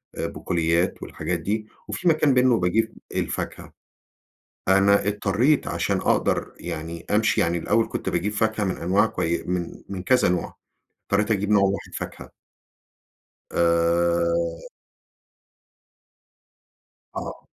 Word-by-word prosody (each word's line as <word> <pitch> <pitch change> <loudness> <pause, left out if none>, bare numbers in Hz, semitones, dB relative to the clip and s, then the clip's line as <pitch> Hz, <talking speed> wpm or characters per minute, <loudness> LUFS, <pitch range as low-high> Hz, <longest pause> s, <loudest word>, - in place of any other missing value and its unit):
آآ - - -2
بقوليات 85 0 0
والحاجات 85 -1 -3
دي، 105 +5 -2 0.2
وفي 180 - -3
مكان 155 -4 +4
منه 125 -3 +4
باجيب 110 +6 +1 0.2
الفاكهة. - - -3 0.9
أنا 100 +1 +4
اضطريت 105 +8 +2
عشان - - 0
أقدر - - 0
يعني 80 +1 -6
أمشي 110 +1 +3
يعني 85 +1 +1
الأول 115 +7 +1
كنت - - -3
باجيب 100 +5 -1
فاكهة 110 0 0
من 95 - -1
أنواع 95 +6 +2
كوي 85 -5 -1
من 90 -1 -4
من 95 -2 -5
كذا 125 -5 +3
نوع، 90 -2 -2 0.5
اضطريت 105 +3 +1
أجيب 105 0 0
نوع 100 -2 +5
واحد 100 0 -1
فاكهة. - - -7 1.2
آآ 85 0 +1 2.5
آه. - - -6
95 Hz, 115 wpm, -24 LUFS, 85-105 Hz, 2.5 s, نوع